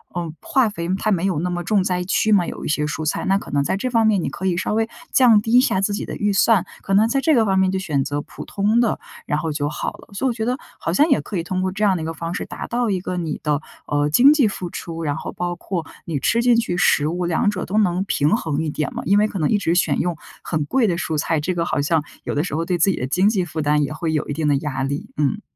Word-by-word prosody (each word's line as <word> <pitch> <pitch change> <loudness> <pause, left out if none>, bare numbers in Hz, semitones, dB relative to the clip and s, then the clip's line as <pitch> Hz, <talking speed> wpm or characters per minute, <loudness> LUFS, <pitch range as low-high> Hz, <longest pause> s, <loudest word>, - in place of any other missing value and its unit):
嗯， 170 -3 -3
化 270 -9 +2
肥 170 -4 -5
它 215 +2 0
没 185 -1 +1
有 185 -6 0
那 180 +3 -1
么 175 0 -2
重 200 -2 +2
灾 180 -1 -1
区 215 +3 +1
嘛， 185 -4 +4
有 - - -6
一 - - -3
些 150 -1 +1
蔬 155 +1 -3
菜， 155 - -1
那 195 +1 +3
可 - - -8
能 145 -1 +2
在 140 - 0
这 230 +6 -2
方 230 -2 +3
面 200 -5 +2
你 - - -1
可 190 - -6
以 180 - +1
稍 185 - -1
微 225 +1 +1 0.2
降 235 -5 +6
低 225 - -3
一 245 - +8
下 190 -7 +1
自 200 - 0
己 - - -3
的 - - -6
预 205 0 0
算， 200 -1 +3 0.2
可 195 - -3
能 215 +3 +4
在 275 - +1
这 310 +1 +3
个 225 -2 +4
方 190 -1 +2
面 190 -1 +3
就 190 - -1
选 150 -8 -1
择 145 0 -2
普 - - -10
通 210 +3 +1
的， 235 -2 +1 0.3
然 150 - 0
后 160 0 -2
就 145 -1 -1
好 150 - -3
了。 - - -16
所 205 +7 -3
以 - - +3
我 240 - -1
觉 220 -1 -3
得 250 +2 0 0.2
好 - - -2
像 300 +3 +4
也 275 - +4
可 205 - -7
以 165 - -1
通 185 +1 -2
过 185 0 -1
这 210 +2 -2
样 190 -3 +3
的 - - -5
一 - - -3
个 165 - -3
方 165 +1 -5
式， - - -3
达 - - -7
到 240 -1 0
一 190 -2 0
个 180 0 -4
你 160 -4 -3
的， 150 -1 0 0.3
呃， 145 0 +1
经 255 - +7
济 275 -8 +3
付 185 -3 -5
出， 165 -1 -6
然 145 -2 -1
后 - - -5
包 175 0 -3
括 170 -2 -4 0.2
你 155 -5 -2
吃 235 - +2
进 240 0 +4
去 230 -6 0
食 150 -4 +3
物， 175 +2 -2
两 175 +4 +1
者 195 -3 -3
都 205 - -2
能 185 -3 +2
平 150 0 +2
衡 160 -5 -2
一 155 - -2
点 150 -1 -3
嘛。 - - -4
因 200 +4 +4
为 210 +1 +4
可 205 - -6
能 150 - +1
一 210 - +3
直 170 -4 0
选 180 - +2
用 175 -3 -1 0.3
很 155 -3 -1
贵 240 - +2
的 170 -2 0
蔬 160 -3 -2
菜， 160 +1 0
这 175 +5 -1
个 170 -1 -1
好 145 - 0
像 155 +1 +1 0.2
有 - - -3
的 145 - +1
时 165 - -4
候 165 - 0
对 180 -1 0
自 175 +4 +3
己 190 - +1
的 125 - -3
经 180 +8 +2
济 195 -4 +1
负 160 -2 -4
担 150 0 +2
也 140 - -3
会 160 0 -2
有 155 - -1
一 145 - -1
定 155 0 -1
的 145 - +3
压 135 -2 -3
力， 140 +2 -3
嗯。 150 +8 0
180 Hz, 335 characters per minute, -21 LUFS, 155-210 Hz, 0.3 s, 一